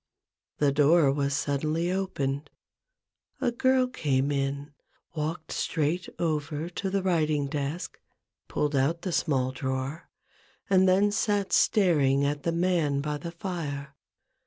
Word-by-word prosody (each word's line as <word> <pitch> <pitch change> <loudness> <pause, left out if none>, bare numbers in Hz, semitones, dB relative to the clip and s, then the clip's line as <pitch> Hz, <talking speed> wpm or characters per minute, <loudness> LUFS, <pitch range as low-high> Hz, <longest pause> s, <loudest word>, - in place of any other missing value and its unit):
The 145 -1 +3
door 145 +1 +4
was 140 0 0
suddenly 155 +4 0
opened: 145 -7 -2 0.9
a 255 -3 +1
girl 260 +2 +3
came 145 - 0
in, 140 +1 -2 0.4
walked 155 +1 -4
straight 160 +2 -1
over 155 -1 -2
to 190 +2 -3
the 195 0 -1
writing 155 -5 +1
desk, 145 +4 -4 0.5
pulled 150 -1 -1
out 155 +6 +1
the 185 - -2
small 135 -6 +1
drawer, 130 +4 -4 0.6
and 190 -1 +4
then 200 +3 +4
sat 205 -1 0
staring 145 -9 +3
at 145 0 -1
the 165 - 0
man 165 -5 +1
by 150 0 -3
the 170 +1 -6
fire. 150 -6 -5
155 Hz, 130 wpm, -27 LUFS, 140-180 Hz, 0.9 s, door